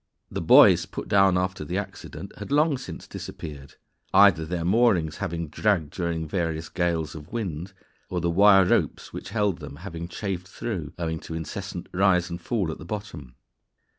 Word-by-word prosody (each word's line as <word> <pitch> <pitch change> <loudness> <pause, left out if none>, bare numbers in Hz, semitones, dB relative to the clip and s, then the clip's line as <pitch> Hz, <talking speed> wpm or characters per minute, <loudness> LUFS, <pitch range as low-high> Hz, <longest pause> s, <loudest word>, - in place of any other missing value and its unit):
The - - -3
buoys - - +7
put - - -6
down 95 -2 +4
after 90 -2 -1
the 75 - -3
accident - - -7
had - - -7
long 145 -1 +3
since 90 -10 -8
disappeared, 70 -3 -8 0.4
either 95 -5 +6
their 85 -1 -2
moorings 95 -6 +3
having 85 0 -3
dragged 85 -2 0
during 85 -3 -2
various 80 -2 -2
gales 85 -3 -1
of 75 -2 -10
wind, 95 -6 -4 0.4
or 90 - -1
the 85 0 0
wire 95 +1 +6
ropes - - 0
which - - -7
held 105 -4 0
them 70 -2 -8
having 85 0 -7
chafed 90 -1 -4
through, 95 -7 -5
owing 80 -2 -2
to 80 - -7
incessant 80 -1 -5
rise 90 -2 +3
and 85 +1 -5
fall 100 -5 -1
at - - -8
the - - -8
bottom. 80 - -7
85 Hz, 170 wpm, -25 LUFS, 80-100 Hz, 0.4 s, buoys